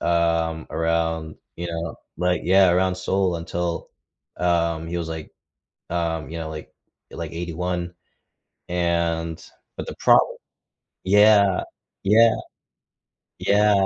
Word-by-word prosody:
um, 85 -1 +1
around, 80 -1 -1 0.2
you 85 - -4
know, 85 -2 -4 0.2
like 90 0 +1
yeah, 95 0 +5
around 90 +1 +2
Seoul 95 -1 0
until, 85 +1 -3 0.5
um, 85 -2 +1
he 85 +1 -3
was, 85 -1 -3
like 80 -1 -6 0.6
um, 85 -2 -2
you 85 - -5
know, 80 -1 -5
like 75 0 -8 0.4
like 85 -1 -6
81. 85 +1 -3 0.8
And 85 -2 -1 0.3
but - - -5
the - - -6
problem - - +4 0.7
yeah, 100 -1 +5 0.4
yeah. 110 +3 +6 1.1
Yeah. 100 -1 +4
85 Hz, 115 wpm, -23 LUFS, 80-90 Hz, 1.1 s, yeah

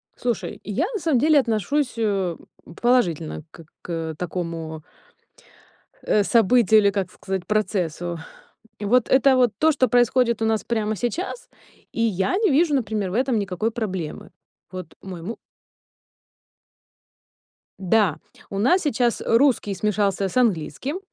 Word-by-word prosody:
Слушай, 240 -2 -3
я 225 - -1
на 425 - -2
самом 315 -7 +1
деле 305 +2 +5
отношусь, 250 +3 0
э, 195 -6 0 0.4
положительно 175 - +1
как 165 - -14
к - - -69
к 165 -2 -4
такому 165 -3 -5 1.2
э, 210 - +2
событию 225 0 +4
или, 200 -1 +4
как 195 -2 -2
сказать, 190 -2 -5
процессу. 175 -5 -1 0.6
Вот 225 +4 +2
это 265 0 +5
вот 245 -4 +3
то, 315 +1 +4
что 260 -3 +2
происходит 240 -1 +2
у - - +2
нас 220 -1 0
прямо 220 -2 -1
сейчас, 350 - -4 0.4
и - - -4
я 220 - +1
не 430 -3 +2
вижу, 300 +2 +3
например, 215 -6 -1
в - - -5
этом 255 0 +1
никакой 200 +2 -2
проблемы. 190 -9 -5 0.4
Вот 185 0 -8
мой 185 -3 -8
му 225 +7 -6 2.4
Да, 195 -3 +2 0.3
у 195 - -4
нас 355 - +3
сейчас 245 -5 0
русский 230 -4 +3
смешался 200 -1 0
с 185 - -4
английским. 235 - 0
215 Hz, 135 wpm, -23 LUFS, 185-250 Hz, 2.4 s, деле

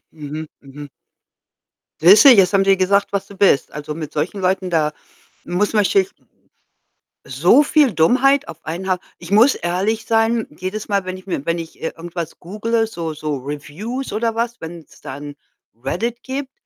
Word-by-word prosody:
mhm, 155 0 -7 0.2
mhm. 140 +1 -10 1.1
Siehst 195 - +8
du, - - +12
jetzt 195 -7 +6
haben 195 -1 +3
die 195 0 +4
gesagt, 200 +2 +2
was 200 -1 -2
du 200 - -14
bist. 190 -8 +3
Also, 150 0 -6
mit 155 -2 -7
solchen 160 +7 -2
Leuten, 185 0 0
da 155 -3 +1 0.5
muss 200 +5 -1
man 210 - +4
sich 385 - +2 1.2
So 295 - +4
viel 290 -5 +3
Dummheit 255 - +3
auf 165 0 -11
einen 175 +4 -5
Haufen. 185 -1 0 0.2
Ich 170 +2 -10
muss 230 +7 +5
ehrlich 195 +6 -1
sein, 225 0 +2
jedes 190 +4 -4
Mal, 200 -2 0
wenn 185 0 -5
ich 185 - -14
mir 175 -7 -3
wenn 165 +2 -1
ich, 165 -1 -9
äh, 160 - -2
irgendwas 170 -1 -6
googele, 225 +5 -1
so 165 -7 -5
so 150 -1 -3
Reviews 150 - -6
oder 225 +1 -1
was, 235 +1 -2
wenn's 165 -1 -10
da 135 -3 -7
'n 145 0 -8 0.4
Reddit 225 - -4
gibt, 270 +1 -5
185 Hz, 175 wpm, -19 LUFS, 160-225 Hz, 1.2 s, du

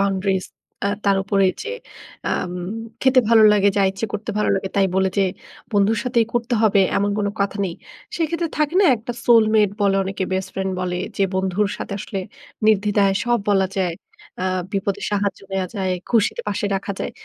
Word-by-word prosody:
boundaries 195 -1 0 0.4
আ - - +2 0.2
তার 200 -1 +3
উপরে 195 0 +1
এই - - -11
যে 455 - -5 0.6
আম 180 - -2 0.5
খেতে 260 -1 +5
ভালো 225 -1 +6
লাগে 205 -1 +4
যা 200 - +4
ইচ্ছে 195 +4 -4
করতে 210 +2 -4
ভালো 210 - +1
লাগে 195 0 -2
তাই 195 -1 +4
বলে 190 0 +3
যে - - +5 0.5
বন্ধুর 205 +2 +3
সাথেই 240 -2 +2
করতে 240 +1 0
হবে 205 -2 +4 0.2
এমন 200 +1 +1
কোন 205 - 0
কথা 200 +1 0
নেই। 175 -3 -3 0.4
সেক্ষেত্রে 335 0 -1
থাকে 305 +3 +1
না 405 - +5
একটা 230 +2 -6
soul-mate 215 -3 +4
বলে 200 -1 +3
অনেকে 190 0 -3
বেস্ট 190 0 -1
ফ্রেন্ড 190 0 -2
বলে 180 -1 -2 0.2
যে 195 - +1
বন্ধুর 190 +2 0
সাথে - - -5
আসলে 200 -1 -5 0.5
নির্দ্বিধায় 205 -2 +3
সব 240 0 +2
বলা 195 -2 +3
যায়। 180 -3 0 0.5
আ 185 - -1 0.3
বিপদে 200 0 -1
সাহায্য 200 -1 -1
নেয়া 190 -1 0
যায়, 190 -2 0 0.2
খুশিতে 225 -3 +2
পাশে 205 - -2
রাখা 200 +1 -3
যায়। - - -3
200 Hz, 185 wpm, -21 LUFS, 195-220 Hz, 0.6 s, ভালো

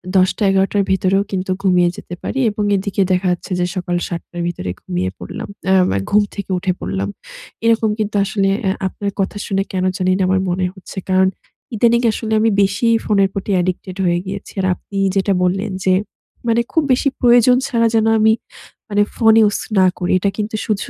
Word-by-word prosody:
১০ঃ০০-১১ঃ০০ 195 +1 +2
র - - +3
ভেতরেও 190 +1 +2
কিন্তু 185 -1 -2
ঘুমিয়ে 180 -2 +3
যেতে 175 - -8
পারি 270 - -3
এবং 210 0 -3
এদিকে 200 0 -1
দেখা 185 +1 +1
যাচ্ছে 175 +2 -5
যে, 175 - +1
সকাল 180 -1 -2
০৭ঃ০০ 170 0 -7
র - - -2
ভিতরে 130 - -4
ঘুমিয়ে 90 +1 -2
পড়লাম, 90 - -7 0.2
অ্যা 190 0 +3
মা 95 - 0
ঘুম 210 +1 +4
থেকে 200 -2 -6
উঠে 185 +1 0
পড়লাম। 95 +2 -3 0.6
এরকম 225 -1 +3
কিন্তু 215 0 -2
আসলে 195 -1 0
অ্যা 190 -1 +1
আপনার 200 +2 -4
কথা 195 +1 -1
শুনে 195 -1 0
কেনো 185 -1 0
জানি 185 -1 +1
না - - -2
আমার 190 +1 +2
মনে 180 +1 0
হচ্ছে। 190 +1 -13
কারণ, 190 0 +4 0.5
ইদানিং 235 +2 +3
আসলে 220 0 -3
আমি 225 +1 +3
বেশিই 215 +4 +2
ফোনের 200 -2 +3
প্রতি 200 +1 -3
addicted 185 +1 -4
হয়ে 175 -1 +2
গিয়েছি। 195 +1 -7
আর - - -1
আপনি 200 - -9 0.2
যেটা 195 0 +2
বললেন 195 +3 0
যে, 185 - +3 0.5
মানে 230 0 +3
খুব 320 - +2
বেশি 255 +3 +2
প্রয়োজন 245 0 +5
ছাড়া 230 -4 +2
যেন 220 -1 +3
আমি 220 +1 +5 0.6
মানে 205 0 +2
ফোন 225 -2 +5
ইউস 210 -2 +2 0.2
না 185 - +6
করি। 180 - -2
এটা 200 - +1
কিন্তু 215 +1 -3
শুঝু 215 -3 -2
195 Hz, 190 wpm, -18 LUFS, 185-215 Hz, 0.6 s, না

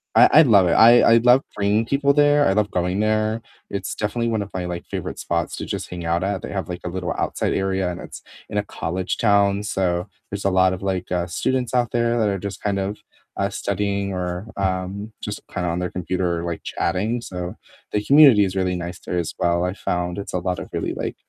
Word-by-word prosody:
I - - +8
I 155 - +9
love 105 -9 +5
it - - +2
I 120 +2 +7
I - - +7
love 125 +3 +5
bringing 105 +2 +1
people 140 +2 +2
there, 145 0 +4
I 95 - +3
love 105 -1 +1
going 90 +2 -1
there, 110 +1 +1 0.3
It's 100 -1 -4
definitely 115 +3 -1
one 110 -2 0
of 100 - -11
my, 90 -1 -2
like, 90 -1 -5
favorite - - -5
spots 85 -1 -2
to - - -5
just - - -4
hang 90 -1 -6
out 85 +2 0
at, 100 -1 -1
they - - -7
have, 95 -4 -3
like, 90 0 -5
a - - -2
little 90 -2 -3
outside - - -1
area, 95 -1 0
and 85 - -7
it's - - -10 0.3
in 105 - -3
a 105 - +1
college 90 -1 -3
town, 100 -2 +3
so, 90 -2 -1 0.2
there's 100 -1 -5
a - - +4
lot 95 0 +4
of, 95 - -6
like, 95 -2 -3
uh, 90 0 0
students 130 +7 -1
out 120 -3 +1
there 120 0 +1
that 110 - +2
are 100 -1 -2
just 100 0 -6
kind 100 -1 -1
of, 100 +2 -3 0.4
uh, - - 0
studying 100 -1 -2
or, 90 +2 -4
um, 95 +3 -2
just 105 - -5
kind 90 -2 -2
of - - 0
on 90 - -2
their 90 - -3
computer, 90 -1 -2
like, 85 -1 -4
chatting, 105 +7 -1
so, 90 -4 -5 0.4
the 105 - 0
community 135 -6 +7
is 95 - -4
really 95 -1 0
nice 90 0 -5
there 90 - -2
as 85 - -3
well. 85 0 +1
I've 90 +2 -2
found 90 0 -2
it's 100 - -6
a 90 - 0
lot 90 0 -2
of - - -8
really, - - -2
like, - - -4
95 Hz, 235 wpm, -22 LUFS, 90-105 Hz, 0.4 s, I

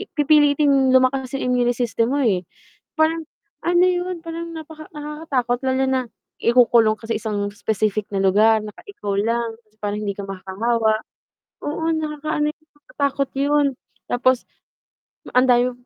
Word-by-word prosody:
pipilitin 290 -2 +4
lumakas 260 0 +3
yung - - -2
immune 245 -1 +2
system 235 +2 0
mo, - - +1
eh. 190 -6 +1 0.5
Parang 320 +1 +2 0.4
ano 350 +1 +4
yun, 360 -1 0
parang 335 0 -6
napaka 315 -1 -9
nakakatakot 295 -5 -2
lalo 260 0 +2
na 260 -1 +1 0.4
ikukulong 235 -2 +4
ka 225 +1 -13
sa - - +1
isang 205 -2 -2
specific 215 0 -1
na 195 - 0
lugar 215 +3 +4
na 210 - -7
ka - - -15
ikaw 205 - -4
lang 230 +1 -1 0.3
para 205 0 -1
hindi 205 -2 -2
ka 200 - -6
makahawa. 215 +4 0 0.6
Oo, 320 +2 -1
nakakaano 305 -1 -1
yun, - - -65
nakakatakot 280 -2 -2
yun. 290 +1 +2 0.4
Tapos 250 0 +1 0.9
ang 255 +1 +5
dami 245 +1 +3
255 Hz, 145 wpm, -21 LUFS, 220-300 Hz, 0.9 s, ang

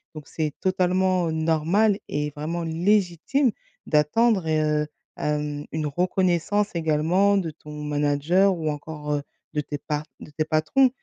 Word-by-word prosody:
Donc 150 -3 -9
c'est 155 -3 -2
totalement, 185 -1 +2
heu, - - -1
normal 165 +7 +2
et 150 0 -2
vraiment 160 +4 -4
légitime 185 - +1 0.3
d'attendre 180 +6 +2
et 155 -1 +2
heu, 150 0 +1 0.3
hem, 150 -1 -2
une 155 -1 -2
reconnaissance 185 +5 +1
également 170 +5 +2
de 170 -4 -1
ton 150 0 -13
manager 150 +6 +2
ou 155 -2 -1
encore, 150 0 -5
heu, 145 - -1 0.3
de 150 - 0
tes 145 0 -5
part 150 +1 -3
de 150 - -11
tes 155 +1 -1
patrons, 160 - +3
160 Hz, 145 wpm, -24 LUFS, 150-185 Hz, 0.3 s, patrons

